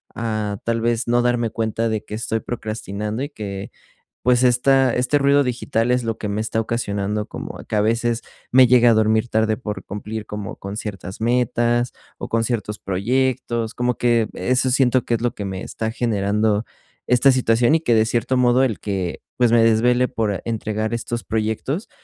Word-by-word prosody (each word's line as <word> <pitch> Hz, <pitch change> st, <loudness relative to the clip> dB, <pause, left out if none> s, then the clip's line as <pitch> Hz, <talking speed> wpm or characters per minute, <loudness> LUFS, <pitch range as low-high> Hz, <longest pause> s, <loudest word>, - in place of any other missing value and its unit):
a 110 Hz, -3 st, -2 dB
tal 115 Hz, 0 st, 0 dB
vez 115 Hz, 0 st, 0 dB
no 120 Hz, 0 st, +3 dB
darme 120 Hz, -1 st, +1 dB
cuenta 115 Hz, +1 st, -1 dB
de 110 Hz, -1 st, -3 dB
que 105 Hz, -, -6 dB
estoy 110 Hz, 0 st, -2 dB
procrastinando 110 Hz, 0 st, -4 dB
y 145 Hz, -, -4 dB
que, 100 Hz, -7 st, -6 dB, 0.5 s
pues 125 Hz, 0 st, +3 dB
esta 130 Hz, +1 st, +4 dB
este 125 Hz, +4 st, +2 dB
ruido 140 Hz, 0 st, +4 dB
digital 120 Hz, -1 st, -1 dB
es 125 Hz, 0 st, +1 dB
lo 115 Hz, -1 st, -2 dB
que 105 Hz, -, -4 dB
me 105 Hz, +1 st, -2 dB
está 110 Hz, 0 st, -1 dB
ocasionando 105 Hz, -2 st, -2 dB
como -, -, -7 dB
que 110 Hz, -, -1 dB
a -, -, +3 dB
veces 115 Hz, +2 st, 0 dB, 0.3 s
me 130 Hz, +1 st, +7 dB
llegue 120 Hz, -1 st, +6 dB
a 115 Hz, -, +6 dB
dormir 110 Hz, +1 st, +2 dB
tarde 110 Hz, 0 st, +1 dB
por 105 Hz, -5 st, -6 dB
cumplir 105 Hz, +2 st, -6 dB
como 105 Hz, -2 st, -6 dB
con 100 Hz, +1 st, -7 dB
ciertas 95 Hz, -3 st, -6 dB
metas 120 Hz, 0 st, +1 dB, 0.3 s
o -, -, -6 dB
con 115 Hz, 0 st, +1 dB
ciertos 110 Hz, -3 st, -2 dB
proyectos, 115 Hz, +3 st, -1 dB
como 125 Hz, 0 st, 0 dB
que 120 Hz, -2 st, +2 dB
eso 130 Hz, +1 st, +1 dB
siento 130 Hz, -1 st, +3 dB
que 120 Hz, -, 0 dB
es 115 Hz, -, -1 dB
lo 120 Hz, -, 0 dB
que 100 Hz, -, -5 dB
me 95 Hz, -1 st, -4 dB
está 110 Hz, 0 st, -4 dB
generando 105 Hz, -1 st, 0 dB, 0.4 s
esta 125 Hz, +3 st, +5 dB
situación 120 Hz, +1 st, +3 dB
y -, -, -1 dB
que, 120 Hz, -7 st, +2 dB
de 110 Hz, 0 st, +4 dB
cierto 120 Hz, +3 st, 0 dB
modo, 125 Hz, +1 st, +4 dB
el 110 Hz, -6 st, -2 dB
que, 95 Hz, -4 st, -3 dB, 0.2 s
pues, 120 Hz, -2 st, +3 dB
me 115 Hz, -, +5 dB
desvele 120 Hz, +3 st, +3 dB
por 105 Hz, -4 st, -2 dB
entregar 110 Hz, 0 st, -2 dB
estos 120 Hz, 0 st, -3 dB
proyectos, 110 Hz, -, -2 dB
115 Hz, 190 wpm, -21 LUFS, 105-125 Hz, 0.5 s, me